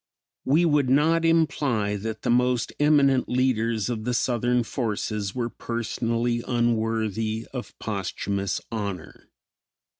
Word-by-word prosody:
We 155 Hz, +6 st, +4 dB
would 145 Hz, -5 st, +2 dB
not 160 Hz, +5 st, +3 dB
imply 140 Hz, -10 st, +1 dB
that 110 Hz, +2 st, -5 dB
the -, -, +1 dB
most 125 Hz, 0 st, +1 dB
eminent 140 Hz, -3 st, +4 dB
leaders 115 Hz, -4 st, +1 dB
of 115 Hz, -3 st, -3 dB
the 125 Hz, +1 st, -1 dB
Southern 120 Hz, 0 st, +1 dB
forces 105 Hz, -4 st, -3 dB
were 120 Hz, -2 st, -2 dB
personally 115 Hz, 0 st, -2 dB
unworthy 110 Hz, -2 st, 0 dB
of 125 Hz, -2 st, -7 dB
posthumos 100 Hz, -1 st, -3 dB
honor. 100 Hz, -7 st, -5 dB
120 Hz, 115 wpm, -25 LUFS, 110-130 Hz, -, We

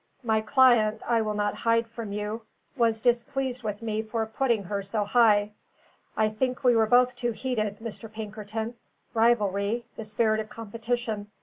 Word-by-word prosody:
"My 220 Hz, -2 st, +2 dB
client, 220 Hz, -2 st, +4 dB
I 235 Hz, -1 st, +3 dB
will 215 Hz, -1 st, -2 dB
not 205 Hz, 0 st, 0 dB
hide 230 Hz, 0 st, +1 dB
from 225 Hz, -2 st, -7 dB
you, 210 Hz, +2 st, -3 dB, 0.3 s
was 230 Hz, -4 st, +1 dB
displeased 250 Hz, +1 st, 0 dB
with 210 Hz, -1 st, -4 dB
me 220 Hz, -1 st, -1 dB
for 220 Hz, 0 st, -2 dB
putting 225 Hz, -1 st, 0 dB
her 200 Hz, +2 st, -3 dB
so 205 Hz, +2 st, -1 dB
high. 210 Hz, -2 st, +4 dB, 0.7 s
I 215 Hz, -, +3 dB
think 250 Hz, +5 st, -2 dB
we 245 Hz, -2 st, +5 dB
were 220 Hz, -1 st, +4 dB
both 250 Hz, +2 st, +4 dB
too 240 Hz, -1 st, -2 dB
heated, 215 Hz, -4 st, -2 dB
Mr. 225 Hz, 0 st, -8 dB
Pinkerton: 220 Hz, +1 st, -5 dB, 0.4 s
rivalry 220 Hz, -1 st, +2 dB
the 225 Hz, -, -5 dB
spirit 215 Hz, +1 st, +1 dB
of 215 Hz, 0 st, -5 dB
competition. 225 Hz, -1 st, -3 dB
225 Hz, 165 wpm, -27 LUFS, 215-235 Hz, 0.7 s, we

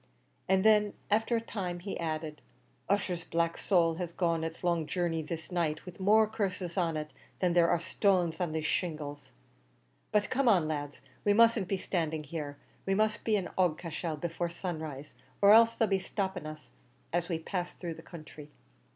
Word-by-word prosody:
And 190 Hz, 0 st, +4 dB
then, 210 Hz, -1 st, +5 dB, 0.2 s
after 225 Hz, +3 st, +2 dB
a -, -, +2 dB
time, 185 Hz, -6 st, -4 dB
he 195 Hz, +3 st, -5 dB
added, 155 Hz, -2 st, -3 dB, 0.5 s
"Ussher's 190 Hz, -4 st, 0 dB
black 170 Hz, 0 st, 0 dB
soul 165 Hz, -4 st, +2 dB
has 175 Hz, -2 st, -3 dB
gone 170 Hz, -2 st, 0 dB
its 165 Hz, +2 st, -5 dB
long 170 Hz, -3 st, +1 dB
journey 170 Hz, -3 st, -1 dB
this 160 Hz, +3 st, -6 dB
night 160 Hz, -3 st, -1 dB
with 180 Hz, 0 st, -10 dB
more 215 Hz, +3 st, +5 dB
curses 190 Hz, -5 st, -3 dB
on 170 Hz, -4 st, +1 dB
it 155 Hz, 0 st, -5 dB, 0.2 s
than 180 Hz, -2 st, +1 dB
there 170 Hz, -1 st, +5 dB
are 170 Hz, -, +3 dB
stones 180 Hz, -1 st, +1 dB
on 175 Hz, -3 st, 0 dB
these 160 Hz, 0 st, -2 dB
shingles. 145 Hz, -5 st, -3 dB, 0.8 s
But 210 Hz, -1 st, +1 dB
come 265 Hz, 0 st, +2 dB
on, 180 Hz, -8 st, +4 dB
lads, 145 Hz, -4 st, -4 dB, 0.2 s
we 205 Hz, -, +4 dB
mustn't 230 Hz, -3 st, +5 dB
be 195 Hz, -, 0 dB
standing 160 Hz, -4 st, -2 dB
here; 145 Hz, -1 st, -5 dB, 0.3 s
we 195 Hz, -, +2 dB
must 215 Hz, +1 st, +1 dB
be 220 Hz, -, +2 dB
in 195 Hz, -3 st, -1 dB
Aughacashel 165 Hz, -2 st, -1 dB
before 170 Hz, +1 st, -2 dB
sunrise, 160 Hz, -5 st, -6 dB, 0.3 s
or 200 Hz, 0 st, +7 dB
else 230 Hz, +1 st, +7 dB
they'll 225 Hz, -, +2 dB
be 195 Hz, -1 st, +2 dB
stopping 190 Hz, -4 st, -3 dB
us 155 Hz, 0 st, -10 dB, 0.4 s
as 175 Hz, +1 st, 0 dB
we 170 Hz, -, 0 dB
pass 175 Hz, +2 st, -4 dB
through 170 Hz, -2 st, -5 dB
the 160 Hz, -, -11 dB
counthry." 155 Hz, -3 st, -11 dB
175 Hz, 180 wpm, -31 LUFS, 160-195 Hz, 0.8 s, or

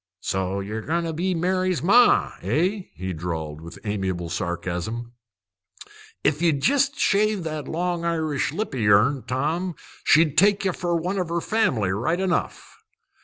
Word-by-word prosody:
"So 95 Hz, +1 st, -2 dB
ye're 105 Hz, +3 st, -4 dB
goin' 170 Hz, +7 st, -1 dB
to 165 Hz, -1 st, -3 dB
be 180 Hz, +3 st, -1 dB
Mary's 185 Hz, +1 st, 0 dB
ma, 240 Hz, +7 st, +5 dB
eh?" 185 Hz, +5 st, 0 dB
he 95 Hz, 0 st, -4 dB
drawled, 80 Hz, -2 st, -5 dB
with 85 Hz, +1 st, -10 dB
amiable 95 Hz, -5 st, -3 dB
sarcasm. 90 Hz, +6 st, -3 dB, 1.1 s
"If 150 Hz, +1 st, +1 dB
ye'd 160 Hz, -5 st, +2 dB
jest 275 Hz, +1 st, +2 dB
shave 210 Hz, -1 st, +2 dB
that 155 Hz, -3 st, -4 dB
long 175 Hz, +1 st, -2 dB
Irish 160 Hz, -5 st, -1 dB
lip 210 Hz, +4 st, -3 dB
o' 130 Hz, -, -3 dB
yourn, 110 Hz, +6 st, +4 dB
Tom, 155 Hz, +8 st, -1 dB, 0.3 s
she'd 155 Hz, -1 st, +4 dB
take 200 Hz, +1 st, +3 dB
ye 190 Hz, -, +2 dB
fer 175 Hz, -1 st, -2 dB
one 180 Hz, +4 st, -1 dB
o' 170 Hz, -1 st, -1 dB
family 150 Hz, -, +1 dB
right 120 Hz, -, 0 dB
enough." 190 Hz, -2 st, -2 dB
160 Hz, 150 wpm, -24 LUFS, -, 1.1 s, ma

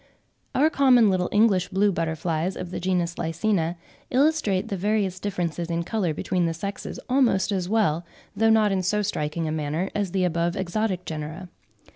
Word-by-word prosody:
Our 305 Hz, +4 st, +4 dB
common 250 Hz, -7 st, +5 dB
little 180 Hz, -1 st, 0 dB
English 205 Hz, -4 st, +3 dB
blue 200 Hz, +2 st, +2 dB
butterflies 165 Hz, +1 st, -2 dB
of 180 Hz, -1 st, -6 dB
the -, -, -4 dB
genus 175 Hz, -2 st, -1 dB
Lycaena, 165 Hz, +1 st, 0 dB, 0.3 s
illustrate 265 Hz, -8 st, +2 dB
the 200 Hz, -, -2 dB
various 195 Hz, -1 st, 0 dB
differences 175 Hz, -4 st, -3 dB
in 170 Hz, 0 st, -1 dB
colour 190 Hz, -2 st, -1 dB
between 175 Hz, +3 st, -1 dB
the 165 Hz, -, -2 dB
sexes, 200 Hz, +4 st, -5 dB
almost 245 Hz, -7 st, +2 dB
as 185 Hz, -2 st, -1 dB
well, 200 Hz, -7 st, +2 dB, 0.3 s
though 225 Hz, +2 st, +3 dB
not 220 Hz, -2 st, +4 dB
in 190 Hz, -1 st, +1 dB
so 210 Hz, +3 st, 0 dB
striking 160 Hz, -4 st, -2 dB
a -, -, -2 dB
manner, 155 Hz, +4 st, -2 dB
as 205 Hz, -2 st, -1 dB
the 185 Hz, +1 st, 0 dB
above 170 Hz, -1 st, 0 dB
exotic 190 Hz, 0 st, -2 dB
genera. 160 Hz, +4 st, -6 dB
185 Hz, 170 wpm, -25 LUFS, 170-210 Hz, 0.3 s, common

